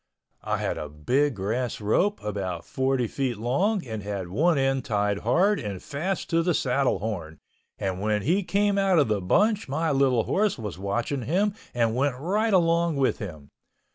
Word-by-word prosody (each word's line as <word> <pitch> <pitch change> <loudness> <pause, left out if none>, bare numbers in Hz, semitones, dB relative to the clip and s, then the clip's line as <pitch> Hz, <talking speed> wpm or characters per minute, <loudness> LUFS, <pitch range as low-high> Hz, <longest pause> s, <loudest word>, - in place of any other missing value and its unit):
I - - -1
had - - -2
a 75 - -5
big 125 - 0
grass 115 +6 -2
rope 180 - +1
about 95 -5 -4
40 130 -1 0
feet 125 0 -2
long 180 - 0
and 110 -3 -5
had 100 -3 -4
one 160 - +2
end 135 -1 +1
tied 105 -2 0
hard 180 - +2
and 100 -4 -5
fast 170 - -3
to 165 0 +3
the 170 -1 +1
saddle 135 0 +1
horn 85 -7 -5 0.4
and 95 -1 -3
when 105 -1 0
he 180 +8 +2
came 200 +1 +1
out 195 -2 +3
of 145 -7 +3
the 105 -2 0
bunch 205 - +2
my 160 +4 0
little 135 -4 +3
horse 205 - +1
was 105 -6 -6
watching 120 +8 -2
him 195 - +1 0.2
and 115 -2 +1
went 135 0 0
right 205 - 0
along 170 -3 +3
with 135 -2 +1
him. 80 - -8
130 Hz, 180 wpm, -26 LUFS, 105-170 Hz, 0.4 s, to